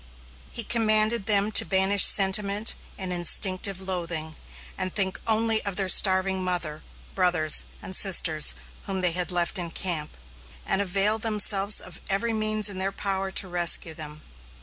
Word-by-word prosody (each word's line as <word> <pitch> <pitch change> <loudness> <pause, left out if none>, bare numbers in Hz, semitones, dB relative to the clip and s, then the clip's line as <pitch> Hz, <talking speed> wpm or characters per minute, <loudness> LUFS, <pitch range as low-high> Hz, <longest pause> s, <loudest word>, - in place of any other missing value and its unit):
He 235 - -2
commanded 215 -1 0
them 205 0 +1
to - - +5
banish 190 +1 +3
sentiment 200 +2 +4 0.2
and 185 -2 -5
instinctive 185 +2 +1
loathing, 170 -4 -5 0.4
and 185 -1 -4
think 190 -2 0
only 225 0 0
of 200 -2 -6
their 195 -1 -3
starving 190 0 +4
mother, 175 -4 -4 0.3
brothers, 175 -5 +1 0.2
and 185 - -6
sisters 165 -6 +3 0.3
whom 190 -1 -4
they 180 -1 +1
had 180 +1 -2
left 175 +2 -3
in 170 -1 -6
camp, 165 -3 -2 0.5
and 195 - 0
avail 200 +3 -1
themselves 210 -2 +1
of - - -11
every 225 +4 -2
means 215 -1 +1
in 195 -2 -5
their 190 +1 -3
power 195 -1 -4
to 190 0 0
rescue 175 -2 +2
them. 150 -1 -10
190 Hz, 150 wpm, -24 LUFS, 180-205 Hz, 0.5 s, to